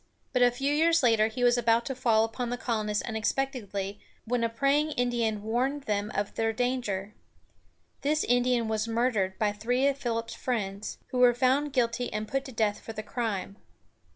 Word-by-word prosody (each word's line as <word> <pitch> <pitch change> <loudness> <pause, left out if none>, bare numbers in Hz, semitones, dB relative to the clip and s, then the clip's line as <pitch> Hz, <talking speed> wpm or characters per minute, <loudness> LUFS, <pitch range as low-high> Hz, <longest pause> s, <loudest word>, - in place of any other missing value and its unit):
But 250 - +2
a 245 - +7
few 270 +4 -1
years 330 +1 +3
later, 225 -3 +4
he 225 +3 -4
was 245 0 +4
about 230 0 +2
to 270 - -2
fall 235 -4 +3
upon 235 +2 -3
the 245 - -2
colonists 215 -4 -1
unexpectedly, 220 -4 -2 0.3
when 240 +1 0
a 230 - +2
praying 280 +6 +1
Indian 235 -5 0
warned 255 +6 -1
them 210 -2 -1
of 205 0 -1
their 225 0 0
danger. 220 -5 -2 0.9
This 305 +2 +1
Indian 245 -1 +2
was 220 0 -1
murdered 225 -5 0
by 210 -1 +1
three 245 +6 0
of 280 0 0
Philip's 230 -3 -2
friends, 205 -5 -3
who 255 - -2
were 245 -1 +6
found 265 +4 +2
guilty 245 -1 0
and 215 0 -3
put 270 +3 -2
to 265 - -8
death 215 -3 0
for 225 - -8
the 215 0 -5
crime. 210 -4 -3
235 Hz, 180 wpm, -28 LUFS, 215-255 Hz, 0.9 s, a